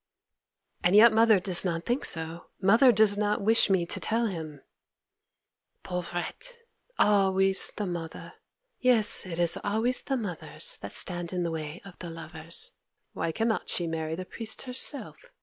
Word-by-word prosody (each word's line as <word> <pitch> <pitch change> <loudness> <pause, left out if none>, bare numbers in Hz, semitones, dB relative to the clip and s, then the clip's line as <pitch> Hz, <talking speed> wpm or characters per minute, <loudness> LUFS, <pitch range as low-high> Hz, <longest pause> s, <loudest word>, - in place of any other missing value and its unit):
'And 180 +3 +3
yet 220 +2 +7
mother 220 -2 +4
does 180 -1 +2
not 170 -2 -3
think 245 +4 -1
so! 165 +1 -1
Mother 225 +7 +5
does 205 -2 +3
not 210 0 0
wish 225 0 +4
me 190 -3 +1
to 170 - -2
tell 230 +2 0
him!' 160 -8 -6 1.2
'Pauvrette! 180 - -5 0.4
Always 195 -2 +3
the 210 - -3
mother! 170 -3 -7 0.5
Yes, 235 -6 +4
it 170 -2 -6
is 170 -1 +3
always 225 +5 -1
the 270 - -3
mothers 220 - -2
that - - -9
stand 175 -2 -2
in 180 -1 -2
the 170 - -3
way 155 +1 -7
of 195 -3 -14
the 175 - -7
lovers. 165 - 0 0.4
Why 165 - -3
cannot 225 +5 -2
she 175 - +1
marry 160 -1 -4
the 185 +2 -7
priest 220 +3 -7
herself? 265 - -2
190 Hz, 155 wpm, -27 LUFS, 170-220 Hz, 1.2 s, yet